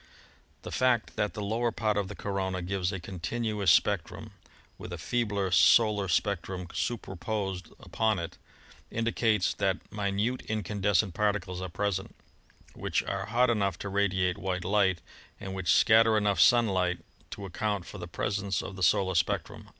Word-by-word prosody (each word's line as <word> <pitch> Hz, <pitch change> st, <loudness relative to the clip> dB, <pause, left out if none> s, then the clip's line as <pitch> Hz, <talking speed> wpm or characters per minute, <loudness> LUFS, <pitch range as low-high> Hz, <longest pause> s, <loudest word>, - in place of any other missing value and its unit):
The -, -, -7 dB
fact 125 Hz, -3 st, +1 dB
that 105 Hz, -1 st, -1 dB
the 105 Hz, -, -4 dB
lower 115 Hz, +3 st, 0 dB
part 110 Hz, -2 st, 0 dB
of 100 Hz, -2 st, 0 dB
the 105 Hz, -, -8 dB
corona 95 Hz, -3 st, -3 dB
gives 95 Hz, 0 st, -1 dB
a 95 Hz, -, -4 dB
continuous 100 Hz, +3 st, -2 dB
spec 95 Hz, 0 st, +4 dB
trum, -, -, -10 dB, 0.5 s
with 90 Hz, -, -8 dB
a 85 Hz, -, -4 dB
feebler 100 Hz, 0 st, -1 dB
solar 105 Hz, +1 st, +5 dB
spectrum 90 Hz, 0 st, -1 dB
superposed 95 Hz, -4 st, -3 dB
upon 110 Hz, -2 st, 0 dB
it, 85 Hz, -2 st, -6 dB, 0.5 s
indicates 115 Hz, -5 st, +1 dB
that 95 Hz, -2 st, -2 dB
minute 105 Hz, +4 st, -1 dB
incandescent 100 Hz, -2 st, 0 dB
particles 100 Hz, -2 st, -1 dB
are 95 Hz, -, -4 dB
present, 95 Hz, +1 st, -2 dB, 0.6 s
which -, -, -1 dB
are -, -, -3 dB
hot 120 Hz, +2 st, +3 dB
enough 100 Hz, -5 st, 0 dB
to 100 Hz, -, -5 dB
radiate 95 Hz, -2 st, +1 dB
white 95 Hz, -2 st, -3 dB
light, 95 Hz, -3 st, +2 dB, 0.4 s
and 95 Hz, -2 st, -6 dB
which 95 Hz, -2 st, 0 dB
scatter 110 Hz, -1 st, +5 dB
enough 100 Hz, -3 st, +1 dB
sunlight 90 Hz, -1 st, +4 dB, 0.3 s
to 100 Hz, -, -7 dB
account 100 Hz, 0 st, -2 dB
for 105 Hz, -, -9 dB
the 85 Hz, -, -6 dB
presence 100 Hz, +1 st, -2 dB
of 95 Hz, -, -7 dB
the 95 Hz, -, -9 dB
solar 95 Hz, +1 st, +3 dB
spectrum. 85 Hz, -, -1 dB
100 Hz, 155 wpm, -29 LUFS, 95-105 Hz, 0.6 s, solar